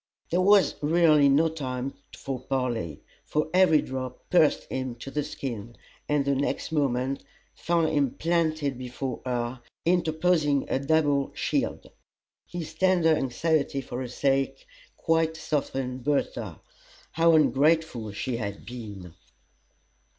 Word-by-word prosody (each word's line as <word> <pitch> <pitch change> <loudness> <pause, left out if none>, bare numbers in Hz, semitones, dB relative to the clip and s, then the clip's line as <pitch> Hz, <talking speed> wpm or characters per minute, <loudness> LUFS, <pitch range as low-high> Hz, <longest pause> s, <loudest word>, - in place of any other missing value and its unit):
There 175 +2 +2
was 200 +1 +5
really 155 -2 +5
no 150 +4 +4
time 135 -4 -4 0.2
for 135 -2 -4
parley, 125 - -3 0.2
for 150 +1 -1
every 180 -5 +5
drop 130 -1 -6
pierced 160 -4 +4
him 130 -2 -4
to 130 +3 -9
the 150 +1 -1
skin, 120 -5 -6 0.3
and 145 -2 +2
the 140 - +2
next 140 +3 -2
moment 135 -3 0 0.3
found 165 -2 +1
him 140 -2 +2
planted 155 -5 0
before 125 0 -5
her, 120 0 -2 0.2
interposing 160 -4 +2
a - - +1
double 145 -1 +2
shield. - - -2 0.6
His 165 -2 -6
tender 175 -2 +3
anxiety 140 +1 0
for 125 -1 -6
her 130 - -4
sake 135 - 0 0.3
quite 160 0 +1
softened 135 -5 -2
Bertha. 145 +1 -2 0.5
How 165 0 +4
ungrateful 150 -6 +2
she 120 +4 -3
had 100 -3 -5
been! 105 -8 -8
140 Hz, 125 wpm, -27 LUFS, 130-160 Hz, 0.6 s, was